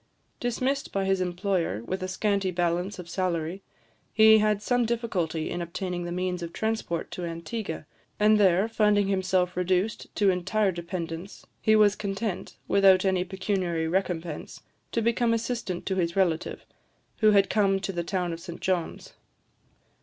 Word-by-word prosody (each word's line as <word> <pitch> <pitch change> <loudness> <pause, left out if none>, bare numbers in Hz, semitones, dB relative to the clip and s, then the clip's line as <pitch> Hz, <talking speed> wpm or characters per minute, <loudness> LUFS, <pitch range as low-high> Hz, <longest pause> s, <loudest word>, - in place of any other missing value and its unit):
Dismissed 255 +3 -1
by 195 -1 -1
his 190 -1 +1
employer, 180 - -1
with 185 +10 -4
a 185 - -2
scanty 200 0 0
balance 175 +2 -1
of 180 -2 -8
salary, 175 0 -2 0.5
he 220 0 +7
had 210 -1 +2
some 245 +2 +2
difficulty 205 -9 -1
in 175 - -3
obtaining 175 +1 -4
the 175 - -4
means 180 0 -2
of 170 -1 -5
transport 220 -5 -2
to 180 - -5
Antigua; 170 +1 -5 0.3
and 210 0 +5
there, 190 +1 +4
finding 210 -3 +2
himself 185 -2 +1
reduced 185 +4 0
to 200 -2 +4
entire 190 +3 +1
dependence, 170 +1 -6 0.2
he 220 - +4
was 210 -1 +5
content, 200 -1 -4
without 195 -1 +5
any 185 -1 +2
pecuniary 185 -3 -1
recompense, 175 -3 -3 0.3
to 230 - 0
become 235 0 +2
assistant 230 -6 -3
to 190 - -1
his 170 -2 0
relative, 175 -4 0 0.5
who 215 - +5
had 200 -1 +5
come 195 -2 +2
to 195 0 -3
the 175 -1 -2
town 180 -1 -2
of 165 - -6
St 170 0 -8
John's. 180 -3 -2
190 Hz, 155 wpm, -27 LUFS, 175-210 Hz, 0.5 s, he